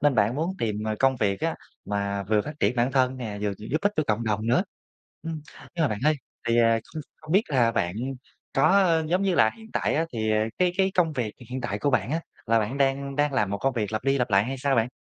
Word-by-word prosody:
nên 145 -1 +3
bạn 110 0 +2
muốn 160 +5 -1
tìm, 105 -2 -2
ờ, 110 0 -1
công 135 -1 +3
việc 100 -5 0
á - - 0 0.3
mà 100 -1 -2
vừa 105 +2 +2
phát 150 - -6
triển 125 - +2
bản 120 +2 +1
thân 130 -1 +2
nè, 110 -5 -5
vừa 105 -1 0
giúp 115 +9 -2
ích 205 +1 +2
cho 155 - +3
cộng 110 +2 0
đồng 110 0 -1
nữa, 120 +9 +3 0.6
ưm. 165 -1 -4 0.3
Nhưng 170 - 0
mà - - +2
bạn 105 - -3
ơi, 155 +1 +4 0.3
thì, 115 0 +3
ờ, 115 -1 +4
không 155 - -4
không 155 0 -8
biết 195 +3 +5
là 120 -5 +3
bạn 90 -6 0 0.6
có 170 +2 +4
giống 180 +4 +1
như 195 -2 +2
là, 110 - +5
hiện 220 0 -14
tại - - 0
á 160 - +2
thì, 110 -2 -1
à, 110 0 +2
cái 180 -1 +3
cái 190 0 +3
công 170 -3 +2
việc 120 -7 -2 0.2
hiện 130 +1 -3
tại 105 -5 -3
của 140 - +1
bạn 130 -1 +1
á, 160 +3 0 0.3
là 115 +1 +4
bạn 110 +5 -2
đang 140 0 0
đang 145 -1 +2
làm 105 -7 +1
một 100 - -2
công 135 +6 +1
việc 110 -3 -2
lặp 110 +2 -2
đi 135 0 +2
lặp 125 -2 0
lại 100 0 +4
hay 135 +3 -3
sao 135 +1 +1
bạn? 115 +1 +2
125 Hz, 270 wpm, -26 LUFS, 110-150 Hz, 0.6 s, biết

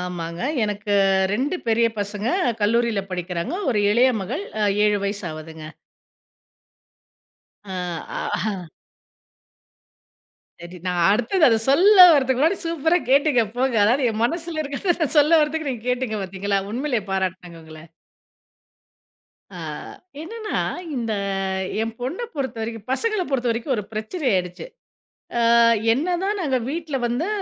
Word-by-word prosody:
ஆமாங்க, 170 -2 -5 0.2
எனக்கு 205 0 -2 0.4
2 275 - -1
பெரிய 230 +1 +3
பசங்க 205 +2 -3 0.3
கல்லூரியில 230 -1 +1
படிக்கிறாங்க, 180 - -3 0.2
ஒரு 215 -4 +1
இளைய 250 +4 +4
மகள் 265 - -4 0.2
அ - - +3 0.2
7 210 -1 +2
வயசு 200 0 -3
ஆவுதுங்க. 155 0 -9 2.0
ம்ஆஹ 180 +1 -4 1.9
சரி 170 +1 -10
நான் 180 -1 0
அடுத்தது 245 - +2
அதை 225 -2 +3
சொல்ல 385 +9 +5 0.2
வரதுக்கு 260 -4 +2
முன்னாடி 325 +6 +3
சூப்பரா 330 +1 +1
கேட்டிங்க 280 -3 +4
போங்க, 255 -1 +1
அதாவது 245 +4 +2
என் 220 +1 -3
மனசுல 330 +3 -2
இருக்கறத 315 +3 -1
சொல்ல 305 +3 +5
வரதுக்கு 305 0 -1
நீங்க 235 -3 -6
கேட்டிங்க 250 -3 -1
பார்த்தீங்களா? 195 +1 -2
உண்மையிலே 250 +1 -1
பாராட்டுனூங்க 185 -3 -3
உங்கள. 160 +1 -13 1.7
ஆ - - -8 0.6
என்னன்னா 435 +5 -4 0.4
இந்த 230 -3 -2 0.7
என் 225 0 -3
பொண்ணை 300 - -3
பொறுத்தவரைக்கும் 230 -5 -5
பசங்களை 430 +7 0
பொறுத்தவரைக்கும், 245 0 0
ஒரு 210 - -3
பிரச்சனை 220 +11 -5
ஆயிடுச்சு, 180 - -2 0.7
ஆ - - +2 0.5
என்னதான் 360 - -1
நாங்க 275 -6 +1
வீட்ல 315 -2 -3
வந்து, 245 +9 -2
235 Hz, 115 wpm, -22 LUFS, 200-300 Hz, 2.0 s, சொல்ல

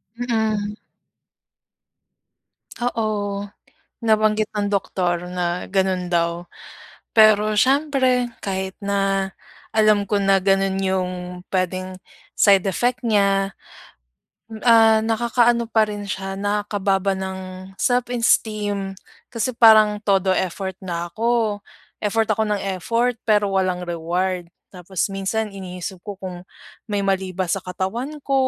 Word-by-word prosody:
Mm. 220 -3 -1 2.1
Oo. 205 -4 -2 0.5
Nabanggit 215 -1 +2
ng 205 0 -1
doktor 180 -3 -1
na 180 0 -2
gano'n 190 -2 0
daw. 170 0 -1 0.7
Pero 215 -1 +5
siyempre 260 0 +2 0.2
kahit 190 -1 -3
na 195 -1 0 0.4
alam 215 -2 +4
ko 200 +1 0
na 195 0 +4
gano'n 195 0 +2
yung 190 -1 0 0.4
puwedeng 185 0 -2 0.4
side 195 -2 +4
effect 245 +6 0
niya. 195 -2 +2 1.1
Ah, 225 -2 +6
nakakaano 235 +1 +2
pa 220 -2 +3
rin 205 -1 -6
siya, 195 0 -4
nakakababa 205 -1 0
ng 190 0 -4 0.4
self-esteem. 215 -5 0 0.3
Kasi 245 +2 -2
parang 215 -3 +6
todo 195 -2 +2
effort 190 +1 -2
na 175 -2 -4
ako. 225 -2 0 0.4
Effort 220 +1 +1
ako 220 - 0
ng 205 -1 0 0.2
effort 235 +3 0
pero 205 -2 +3
walang 185 -2 0
reward. 175 +1 -2 0.2
Tapos 180 0 -3
minsan 205 +2 -2
iniisip 185 -1 -7
ko 200 +2 -8
kung 180 -2 -8 0.4
may 205 -1 -1
mali 190 -1 0
ba 190 - 0
sa 195 - 0
katawan 190 - -4
ko 275 - -1
200 Hz, 110 wpm, -22 LUFS, 190-220 Hz, 2.1 s, Ah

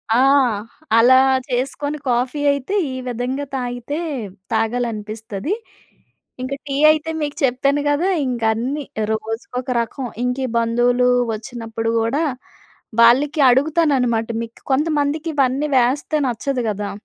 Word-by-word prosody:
ఆ! - - +4 0.8
అలా 245 +3 +7 0.3
చేసుకొని 275 +4 -2
కాఫీ 250 +4 0
అయితే 280 +8 -2 0.2
ఈ - - -5
విధంగా 250 +4 -3
తాగితే, 245 +3 -4 0.6
తాగాలనిపిస్తది. 220 - -2 0.9
ఇంక 260 +2 -3
టీ 275 - -2 0.2
అయితే 310 +1 -1
మీకు 290 -1 -2
చెప్పాను 275 +3 +2
గదా! 320 +7 +1 0.2
ఇంక 245 -2 -2
అన్నీ, 270 +6 -2 0.3
రోజుకొక 225 +3 -4
రకం. 245 +3 -5 0.2
ఇంక 250 0 0
ఈ - - -6
బంధువులు 240 +2 +2 0.3
వచ్చినప్పుడు 225 -1 -4
కూడా 270 +8 0 0.8
వాళ్ళకి 275 +7 +5
అడుగుతానన్నమాట, 265 -5 +2 0.2
మీకు 230 0 -11
కొంతమందికి 300 +2 0
ఇవన్నీ 275 +2 +1
వేస్తే 265 +5 +1
నచ్చదు 250 +2 -2
గదా! 205 -1 -3
250 Hz, 115 wpm, -20 LUFS, 230-285 Hz, 0.9 s, అలా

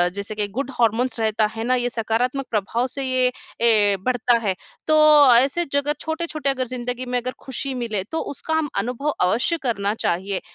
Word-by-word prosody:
जैसे 200 +1 -4
कि 210 -1 -1
good 265 +6 -4
hormones 235 +1 +1
रहता 220 -1 +1
है 225 - -3
ना, 255 +2 +2
ये 245 -1 0
सकारात्मक 245 +4 -1
प्रभाव 230 +4 0
से 275 +2 -4
ये, 255 -1 +2 0.3
ए, 210 -3 +4
बढ़ता 245 -1 +2
है। 190 -2 +1 0.3
तो, 305 -4 +7
ऐसे 275 +8 +3
जगह 285 +1 +1
छोटे-छोटे 315 -2 -3
अगर 260 -2 -1
ज़िंदगी 250 0 -4
में 250 0 -1
अगर 250 +1 -4
खुशी 270 +1 -4
मिले, 230 -6 -3
तो 320 +11 -4 0.2
उसका 320 - -4
हम 315 -2 0
अनुभव 250 +7 -2 0.2
अवश्य 245 - +1
करना 205 -5 0
चाहिए, 190 +3 -1
245 Hz, 180 wpm, -22 LUFS, 220-275 Hz, 0.3 s, तो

